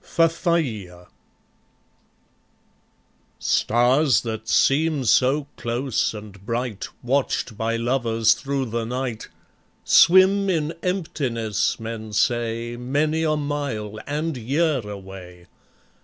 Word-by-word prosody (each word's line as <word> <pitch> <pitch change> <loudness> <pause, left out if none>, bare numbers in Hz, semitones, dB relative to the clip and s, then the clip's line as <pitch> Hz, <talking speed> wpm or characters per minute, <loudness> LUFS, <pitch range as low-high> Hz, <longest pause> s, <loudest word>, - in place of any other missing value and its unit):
Fafaia 145 - 0 2.3
Stars 125 +4 +2
that 110 -1 -5
seem 150 -1 +2
so 135 +5 +3
close 120 0 -1
and 105 -2 -11
bright, 115 -1 -3 0.2
Watched 125 -3 -1
by 115 +2 -1
lovers 115 -2 +2
through 140 -1 -3
the 115 0 -1
night, 120 -1 -4 0.6
Swim 190 +2 +5
in 160 -3 0
emptiness, 125 - -1
men 110 -1 -6
say, 120 +1 0
Many 145 +6 0
a 155 -1 +1
mile 140 -8 -3
and 150 +2 -2
year 140 +5 +1
away. 95 -4 -10
125 Hz, 95 wpm, -23 LUFS, 110-150 Hz, 2.3 s, Swim